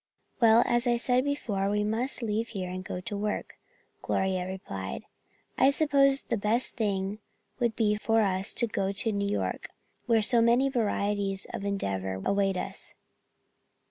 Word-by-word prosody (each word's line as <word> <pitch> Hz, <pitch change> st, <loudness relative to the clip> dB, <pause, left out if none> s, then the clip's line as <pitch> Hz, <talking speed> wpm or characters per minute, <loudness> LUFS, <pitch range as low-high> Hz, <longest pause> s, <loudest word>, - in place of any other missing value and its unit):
"Well, 230 Hz, -1 st, +6 dB
as 240 Hz, 0 st, +1 dB
I 240 Hz, 0 st, +3 dB
said 250 Hz, +1 st, +2 dB
before, 210 Hz, -9 st, -1 dB
we 210 Hz, 0 st, +1 dB
must 235 Hz, +5 st, -1 dB
leave 220 Hz, +1 st, -1 dB
here 185 Hz, -5 st, -5 dB
and 185 Hz, 0 st, -5 dB
go 180 Hz, 0 st, -5 dB
to 205 Hz, +2 st, -5 dB
work," 210 Hz, +1 st, -3 dB, 0.4 s
Gloria 185 Hz, -1 st, -1 dB
replied. 100 Hz, -, -6 dB, 0.6 s
"I 270 Hz, -, +6 dB
suppose 275 Hz, -2 st, +3 dB
the -, -, -2 dB
best 220 Hz, +4 st, 0 dB
thing 200 Hz, -2 st, -1 dB, 0.4 s
would 235 Hz, -3 st, +1 dB
be 210 Hz, -2 st, +2 dB
for 225 Hz, +1 st, +2 dB
us 190 Hz, 0 st, -1 dB
to 235 Hz, -, +3 dB
go 195 Hz, -3 st, -1 dB
to 225 Hz, +3 st, +2 dB
New 200 Hz, -1 st, -1 dB
York, 205 Hz, -, -2 dB, 0.4 s
where 225 Hz, -2 st, +4 dB
so 235 Hz, +2 st, +4 dB
many 240 Hz, +4 st, +4 dB
varieties 205 Hz, -5 st, -1 dB
of 200 Hz, -, -4 dB
endeavor 95 Hz, -, -2 dB
await 195 Hz, -1 st, +1 dB
us. -, -, -7 dB
210 Hz, 160 wpm, -28 LUFS, 195-235 Hz, 0.6 s, Well